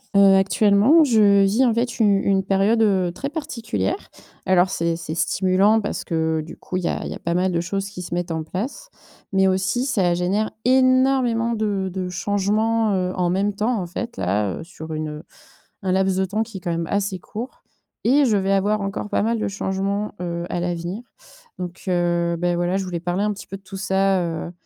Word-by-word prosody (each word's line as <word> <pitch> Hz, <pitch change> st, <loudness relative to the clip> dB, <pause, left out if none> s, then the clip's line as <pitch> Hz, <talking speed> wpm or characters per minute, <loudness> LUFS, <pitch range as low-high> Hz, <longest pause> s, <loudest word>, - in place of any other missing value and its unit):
Heu, 195 Hz, -1 st, +7 dB
actuellement, 205 Hz, -, +5 dB
je 210 Hz, -7 st, +5 dB
vis, 205 Hz, +7 st, +3 dB
en 240 Hz, -, +3 dB
fait, 235 Hz, +2 st, -1 dB
u -, -, +4 dB
une 195 Hz, -1 st, +3 dB
période, 195 Hz, +4 st, +2 dB
heu, 190 Hz, -5 st, +2 dB
très 275 Hz, +10 st, -4 dB
particulière 285 Hz, -, -3 dB, 0.4 s
alors 185 Hz, 0 st, +4 dB
c'est 170 Hz, -1 st, 0 dB
c'est 165 Hz, -1 st, -6 dB
stimulant 190 Hz, +6 st, +2 dB
parce 205 Hz, -, -4 dB
que, 160 Hz, -1 st, 0 dB
du 155 Hz, -, -11 dB
coup, 185 Hz, -, -5 dB
il 180 Hz, -, -3 dB
y -, -, 0 dB
a -, -, -2 dB
il -, -, -5 dB
y -, -, -3 dB
a -, -, -8 dB
pas 170 Hz, 0 st, -2 dB
mal 185 Hz, +1 st, +1 dB
de 170 Hz, -, 0 dB
choses 195 Hz, +3 st, -3 dB
qui 180 Hz, -2 st, -8 dB
se 175 Hz, -, -5 dB
mettent 175 Hz, -1 st, -2 dB
en 160 Hz, -1 st, -2 dB
place 195 Hz, -, -5 dB, 0.4 s
mais 190 Hz, 0 st, +4 dB
aussi 190 Hz, +7 st, 0 dB
ça 190 Hz, -10 st, +1 dB
génère 195 Hz, +5 st, 0 dB, 0.2 s
énormément 255 Hz, -2 st, +3 dB
de 205 Hz, -3 st, -1 dB
de 185 Hz, -1 st, -3 dB
changements, 210 Hz, +4 st, 0 dB
heu, 185 Hz, -1 st, -1 dB
en 180 Hz, -1 st, +1 dB
même 195 Hz, +3 st, 0 dB
temps, 215 Hz, +3 st, 0 dB
en 180 Hz, -, -3 dB
fait, 235 Hz, +7 st, -6 dB
là, 100 Hz, +2 st, 0 dB
heu, -, -, -7 dB
sur 160 Hz, -1 st, -9 dB
une, 155 Hz, 0 st, -3 dB
heu, 150 Hz, +1 st, -8 dB, 0.6 s
un 190 Hz, -, -1 dB
laps 190 Hz, 0 st, +2 dB
de 190 Hz, -, +1 dB
temps 210 Hz, +4 st, -1 dB
qui 220 Hz, -4 st, -9 dB
est -, -, -14 dB
quand 175 Hz, 0 st, -3 dB
même 165 Hz, 0 st, -2 dB
assez 200 Hz, +1 st, -1 dB
court 225 Hz, +7 st, -8 dB, 0.4 s
et 280 Hz, +5 st, +4 dB
je 225 Hz, -5 st, +3 dB
vais 195 Hz, 0 st, +1 dB
avoir 205 Hz, +2 st, +1 dB
encore 195 Hz, +1 st, -4 dB
pas -, -, 0 dB
mal 225 Hz, +1 st, 0 dB
de -, -, -1 dB
changements, 195 Hz, +1 st, -2 dB
heu, 170 Hz, -1 st, -3 dB
à 175 Hz, -, -1 dB
l'avenir, 175 Hz, +4 st, -3 dB, 0.6 s
donc, 175 Hz, -1 st, -6 dB
heu, 175 Hz, -1 st, +1 dB
beh 175 Hz, +1 st, 0 dB
voilà, 175 Hz, +2 st, 0 dB
je 195 Hz, -, -1 dB
voulais 175 Hz, -2 st, -4 dB
parler 175 Hz, +3 st, -1 dB
un 210 Hz, -, +1 dB
petit 200 Hz, -, -10 dB
peu 195 Hz, -, -6 dB
de 195 Hz, -, -17 dB
tout 195 Hz, 0 st, -9 dB
ça, 195 Hz, -1 st, +1 dB
heu, 165 Hz, 0 st, -4 dB
195 Hz, 220 wpm, -22 LUFS, 175-215 Hz, 0.6 s, Heu